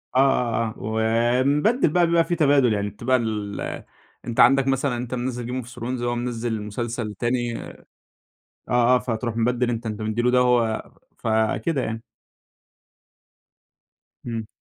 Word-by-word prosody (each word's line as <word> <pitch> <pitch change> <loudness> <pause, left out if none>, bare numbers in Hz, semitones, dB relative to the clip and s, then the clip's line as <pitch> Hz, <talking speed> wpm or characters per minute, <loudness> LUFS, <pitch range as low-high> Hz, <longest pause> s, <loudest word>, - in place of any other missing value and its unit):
آه، - - +5
آه، 120 -4 +2
آه، 110 - -8
و 110 +1 -4 0.5
بنبدل 155 - +2
بقى 175 +2 +3
بيبقى 170 0 +3
في 175 - -1
تبادل، 140 -7 +4
يعني 100 0 -1
بتبقى 120 +6 0
ال 105 -3 -4 0.4
أنت 120 -1 -4
عندك 135 +2 +6
مثلًا 135 -1 0
أنت 125 +1 -5
منزل 125 -1 -3
Game 125 -1 -4
of - - -12
Thrones 125 0 -5
هو 120 0 -1
منزل 120 -2 -3
مسلسل 110 +1 -4
تاني 120 +2 -1
آه، - - -10 0.9
آه 125 +1 +4
فتروح 115 -1 -3
مبدّل 120 +1 +1
أنت، 115 0 -4
أنت 110 0 -4
مدِّي 110 +2 -1
له 125 - +3
ده 125 0 +4
وهو 120 -3 +1 0.3
فكده 110 +7 0
يعني. 115 0 -4 2.3
إمم. 115 -2 -4
120 Hz, 150 wpm, -23 LUFS, 115-130 Hz, 2.3 s, عندك